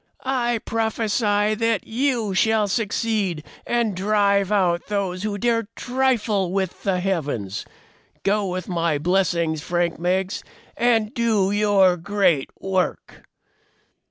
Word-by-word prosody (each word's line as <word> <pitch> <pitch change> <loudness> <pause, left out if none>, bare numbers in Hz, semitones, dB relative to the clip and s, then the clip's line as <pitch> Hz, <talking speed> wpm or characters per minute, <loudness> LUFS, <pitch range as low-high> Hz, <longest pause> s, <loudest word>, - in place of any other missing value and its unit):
"I 240 -3 +1
prophesy 215 -2 +1
that 230 -1 0
you 235 -4 0
shall 220 +2 +2
succeed 205 -5 -1 0.2
and 235 -4 0
drive 200 0 +2
out 180 -4 +1
those 195 -3 -2
who 210 0 -2
dare 230 -1 0
trifle 235 -7 0
with 190 -2 -2
the 190 -3 0
heavens. 145 - -2 0.6
Go 205 +1 +1
with 185 -1 -4
my 170 -4 0
blessings, 170 -1 +1
Frank 175 0 -1
Meggs, 185 +3 -1 0.3
and 230 -2 +2
do 220 -6 +1
your 200 -3 +4
great 175 -5 +1
work!" 190 -1 -3
200 Hz, 115 wpm, -22 LUFS, 180-220 Hz, 0.6 s, your